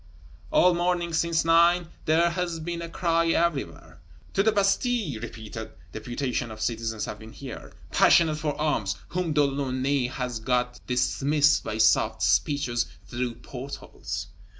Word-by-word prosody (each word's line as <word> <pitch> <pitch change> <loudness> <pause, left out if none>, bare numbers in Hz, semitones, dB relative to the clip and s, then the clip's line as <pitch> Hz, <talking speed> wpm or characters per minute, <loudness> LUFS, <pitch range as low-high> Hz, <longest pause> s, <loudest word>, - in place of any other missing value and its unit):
All 180 - +5
morning, 175 -1 0
since 165 0 +1
nine, 170 +1 +4 0.2
there 170 +2 +3
has 170 -1 -2
been 170 +1 -4
a 170 - -5
cry 165 -1 +1
everywhere: 165 -3 -1 0.3
To 195 - +3
the 220 +2 +3
Bastille! 200 - +1
Repeated 110 -1 -7 0.2
"deputations 120 +1 -3
of 110 - -9
citizens" 110 -1 -2
have 105 - -7
been 110 0 -11
here, 135 -4 -9 0.2
passionate 160 -3 +5
for 150 -1 -2
arms, 145 -11 0
whom 180 -2 -1
De 150 -1 +4
Launay 135 -1 0
has 125 -2 -4
got 125 +1 0
dismissed 145 +4 +2
by 110 - -4
soft 110 - +3
speeches 140 -5 +1 0.2
through 120 -1 -3
port 135 +2 -7
holes. - - -7
145 Hz, 145 wpm, -26 LUFS, 125-170 Hz, 0.3 s, All